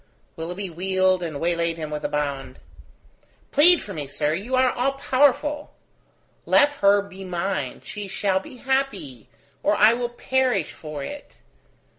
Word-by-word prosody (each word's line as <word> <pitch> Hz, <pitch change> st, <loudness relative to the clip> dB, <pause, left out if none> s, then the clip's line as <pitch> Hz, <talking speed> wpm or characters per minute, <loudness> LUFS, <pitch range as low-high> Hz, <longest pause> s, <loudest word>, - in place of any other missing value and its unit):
Willoughby 175 Hz, +4 st, -5 dB
wheeled 185 Hz, +1 st, +1 dB
and 160 Hz, -5 st, -4 dB
waylaid 170 Hz, 0 st, 0 dB
him 155 Hz, -2 st, -5 dB
with 150 Hz, 0 st, -4 dB
a -, -, -1 dB
bound. 140 Hz, -2 st, -3 dB, 0.9 s
"Plead 335 Hz, +4 st, +6 dB
for 205 Hz, -, -8 dB
me, 150 Hz, -4 st, -5 dB
sir; 150 Hz, +2 st, -1 dB
you 215 Hz, +10 st, -2 dB
are 255 Hz, -1 st, +4 dB
all 265 Hz, +3 st, 0 dB
powerful. 290 Hz, +2 st, +1 dB, 0.7 s
Let 285 Hz, -, +6 dB
her 200 Hz, 0 st, +5 dB
be 195 Hz, -1 st, -11 dB
mine, 175 Hz, -7 st, -3 dB
she 205 Hz, -1 st, -6 dB
shall 190 Hz, 0 st, 0 dB
be 195 Hz, -, -12 dB
happy, 265 Hz, -, -2 dB, 0.3 s
or 210 Hz, -, +2 dB
I 215 Hz, +2 st, +6 dB
will 240 Hz, 0 st, -2 dB
perish 250 Hz, -, 0 dB
for 150 Hz, -3 st, -7 dB
it. 290 Hz, -, -9 dB
190 Hz, 150 wpm, -24 LUFS, 160-255 Hz, 0.9 s, Plead